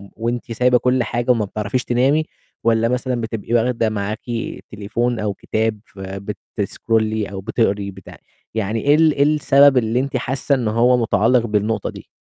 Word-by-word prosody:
وأنتِ 120 +1 -3
سايبة 125 +2 +3
كُلّ 125 0 +1
حاجة 120 +2 0
وما 110 -4 +1
بتعرَفيش 105 +5 -2
تنامي؟ 135 +6 +2 0.4
والَّا 115 0 +3
مثلًا 125 0 -1
بتبقي 115 0 -4
واخدة 115 -1 +2
معاكِ 105 +1 -3 0.5
تليفون 115 +4 -2
أو 105 -1 -1
كتاب 110 +2 -2
فبتسكرولي 105 +2 -3
أو 95 - -6
بتقري 100 -1 0
بتاع؟ 95 -1 -13 0.4
يعني 110 0 -1
إيه 145 +1 +4
ال 160 0 +5
إيه 140 - +2
السبب 145 -2 +5
اللي 115 +1 +1
أنتِ 140 0 -1
حاسّة 135 +3 0
إن 120 -4 -2
هو 120 +3 +3
متعلّق 115 +1 +2
بالنقطة 105 0 -1
دي؟ - - -11
115 Hz, 155 wpm, -20 LUFS, 105-125 Hz, 0.5 s, ال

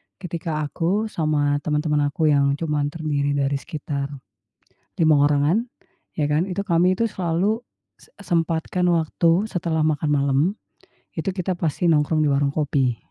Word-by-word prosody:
ketika 165 -4 -4
aku 190 +8 -1
sama 145 -2 +1
teman-teman 150 -1 0
aku 155 +2 +1
yang 140 -1 +3
cuman 150 -1 -1
terdiri 145 -2 -1
dari 140 0 0
sekitar, 145 -3 -5 0.9
5 155 -1 +5
orangan, 150 +10 +2 0.5
ya 150 -2 -1
kan 150 +4 +2
itu 190 0 -3
kami 180 -2 +2
tuh 230 +4 0
selalu 185 +4 0 0.4
s - - -22
sempatkan 170 -1 0
waktu 170 +5 +1
setelah 165 -3 -1
makan 155 -1 0
malam, 140 -1 +2 0.7
itu - - -4
kita 185 -1 -2
pasti 170 0 0
nongkrong 155 +1 +2
di - - +2
warung 140 0 +2
kopi. 135 -5 +1
155 Hz, 140 wpm, -22 LUFS, 145-170 Hz, 0.9 s, 5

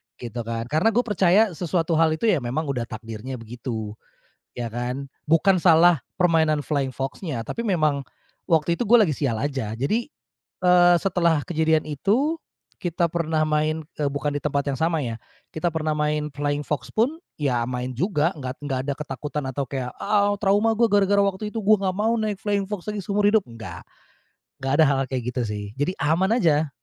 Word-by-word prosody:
gitu 120 0 -7
kan. 115 0 -2
Karena 185 +9 +2
gue 245 - +4
percaya 205 0 +3
sesuatu 170 0 -1
hal 160 -1 +3
itu 160 - -11
ya, 170 - +2
memang 140 +5 -2
udah 120 -3 -3
takdirnya 115 +3 -7
begitu. 115 -2 -6 0.7
Ya 120 -2 -4
kan? 125 +3 -3 0.2
Bukan 180 +4 +4
salah 170 -2 +5 0.2
permainan 160 -4 +2
flying 140 -3 0
fox-nya, 135 - -4
tapi 230 - -5
memang 155 -10 +1 0.5
waktu 170 0 +2
itu 240 - -1
gue 240 - +8
lagi 160 - 0
sial 135 -5 -1
aja. 130 -4 -3
Jadi, 210 - -1 0.6
eee, 175 -1 +6
setelah 170 -4 +1
kejadian 160 -2 +1
itu, 220 - 0 0.4
kita 175 0 -1
pernah 160 -2 0
main 155 +1 +1 0.2
eee, 145 -2 0
bukan 145 +1 -2
di - - -2
tempat 140 -1 0
yang - - -2
sama 165 0 +1
ya, 115 -2 -3 0.4
kita 175 +2 -1
pernah 155 -1 -1
main 150 0 0
flying 145 +1 -2
fox 140 -5 -3
pun 245 +8 +1 0.2
ya 130 -5 +1
main 125 0 -3
juga, 170 - +1
nggak 130 -2 -5
nggak 135 -3 -1
ada 140 - 0
ketakutan 150 0 -5
atau 135 +1 -2
kayak, 125 -2 -4
"Ah, 205 0 +2
trauma 205 +3 +3
gua 230 +1 +4
gara-gara 200 0 +3
waktu 200 +2 -2
itu 225 - -3
gua 215 +1 +6 0.2
gak - - -10
mau 225 +3 +1
naik 215 -2 -1
flying 205 -1 0
fox 205 -4 -5
lagi 210 -1 -2
seumur 205 +1 0
hidup!" 210 -1 +3
Nggak. 115 -7 -9 0.8
Nggak 135 0 -1
ada - - +8
hal-hal 135 -2 +2
kayak 130 -3 -2
gitu 125 - -1
sih. 105 -1 -4
Jadi 145 +6 0
aman 165 +6 +2
aja. 155 - +2
155 Hz, 185 wpm, -24 LUFS, 135-190 Hz, 0.8 s, gue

